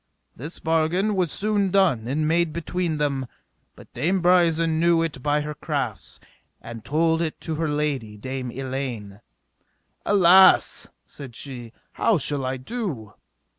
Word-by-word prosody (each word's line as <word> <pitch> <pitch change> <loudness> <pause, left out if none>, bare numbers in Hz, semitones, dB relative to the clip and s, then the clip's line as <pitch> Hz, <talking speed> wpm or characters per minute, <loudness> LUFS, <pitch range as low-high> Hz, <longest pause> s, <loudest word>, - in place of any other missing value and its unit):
This 150 +8 -7
bargain 165 +6 0
was 180 -5 +1
soon 205 -1 +1
done 180 - +2
and 150 +4 -1
made 170 0 +1
between 170 0 -2
them, 140 -3 -1 0.5
but - - -17
Dame 175 +10 0
Brisen 165 -2 +3
knew 170 0 +3
it 145 -5 -4
by 150 +2 +1
her 150 0 -5
crafts, - - -4 0.4
and 115 -1 -9
told 165 +2 +1
it 160 -2 -3
to 160 - -4
her 160 0 -2
lady, 140 -8 -2
Dame 130 +3 -5
Elaine. 125 -6 -5 0.8
Alas, 190 -1 +5 0.2
said 130 -5 -10
she, 120 -4 -7 0.2
how 220 - +2
shall 145 -2 0
I 130 +1 -2
do? 135 - -5
155 Hz, 140 wpm, -23 LUFS, 130-170 Hz, 0.8 s, Alas